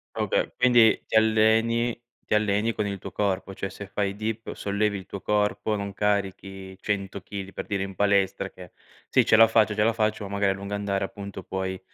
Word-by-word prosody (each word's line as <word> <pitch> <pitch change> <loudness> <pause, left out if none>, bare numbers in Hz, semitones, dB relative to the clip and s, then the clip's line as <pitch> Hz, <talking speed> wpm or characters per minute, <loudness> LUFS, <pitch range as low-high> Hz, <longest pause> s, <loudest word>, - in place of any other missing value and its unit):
Okay, - - 0
quindi 120 -3 +5
ti - - -8
alleni 110 +2 +3 0.3
ti - - 0
alleni 105 +1 +2
con 105 - -1
il 100 -1 -3
tuo - - -9
corpo. 100 -1 -1
Cioè, 95 0 -4
se 100 - -8
fai 100 0 -2
dip, 110 +1 -4
sollevi 100 0 -1
il 95 - -11
tuo 100 - -7
corpo, 105 +1 0
non 100 -1 -4
carichi 95 -2 -2
100 100 -2 -3
chili, 100 -1 -7
per - - -6
dire, 100 -2 -1
in 95 0 -7
palestra, 100 -1 +1
che: 90 -2 -13 0.4
“Sì, - - +4
ce - - +5
la 115 +1 +8
faccio, 110 -1 +3
ce 105 0 +2
la 115 - +3
faccio.” 110 -1 -1
Ma 100 - -7
magari 100 -1 +2
a - - -4
lungo 100 +1 -5
andare 100 -1 -1
appunto 100 -1 -7
puoi, 95 0 -4
100 Hz, 205 wpm, -26 LUFS, 95-110 Hz, 0.4 s, la